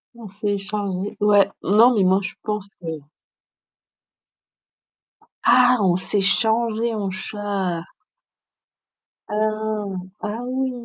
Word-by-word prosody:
On 230 -2 -10
s'est 205 +1 -3
échangés 200 -1 -3
ouais. 205 -1 +4
Non, 225 +6 +5
mais 200 - +3
moi, 185 +1 +4
je 190 - -5
pense 210 -2 -3
que 170 - -8 2.6
Ah! 250 0 +6
On 185 -3 +3
s'est 190 +3 -1
changées 225 +3 +1
en 200 -2 -2
chat. 190 -3 -3 1.5
Ah! 215 -1 -1 0.3
Ah 215 +3 -4
oui! 260 +1 -1
210 Hz, 105 wpm, -22 LUFS, 195-220 Hz, 2.6 s, Ah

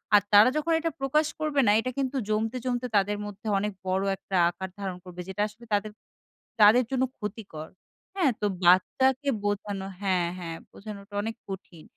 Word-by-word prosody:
আর 205 - +7
তারা 210 +4 +9
যখন 325 +2 +1
এটা 330 0 -1
প্রকাশ 300 +3 +2
করবে 300 -2 +2
না, - - +7
এটা 255 +3 -2
কিন্তু 270 0 -1
জমতে, 220 +3 0
জমতে 250 0 -1
তাদের 205 +1 +1
মধ্যে 205 +1 -8
অনেক 210 0 -2
বড় 190 +1 +1
একটা 195 - -6
আকার 190 +2 -6
ধারণ 190 -2 -4
করবে 180 -1 -8
যেটা 190 +2 -3
আসলে 215 +3 -15
তাদের, 205 +1 0 0.7
তাদের 215 +5 +8
জন্য 260 -1 +1 0.2
ক্ষতিকর। 200 -7 -6 0.5
হ্যাঁ? 340 -9 +3
তো 210 - +1 0.2
বাচ্চাকে 260 +10 +4 0.2
বোঝানো 205 -1 -2 0.2
হ্যাঁ, 185 -3 +1
হ্যাঁ 165 -2 -5
বোঝানোটা 200 -1 -10
অনেক 225 +1 -3
কঠিন 180 -4 -8
210 Hz, 170 wpm, -27 LUFS, 190-255 Hz, 0.7 s, তারা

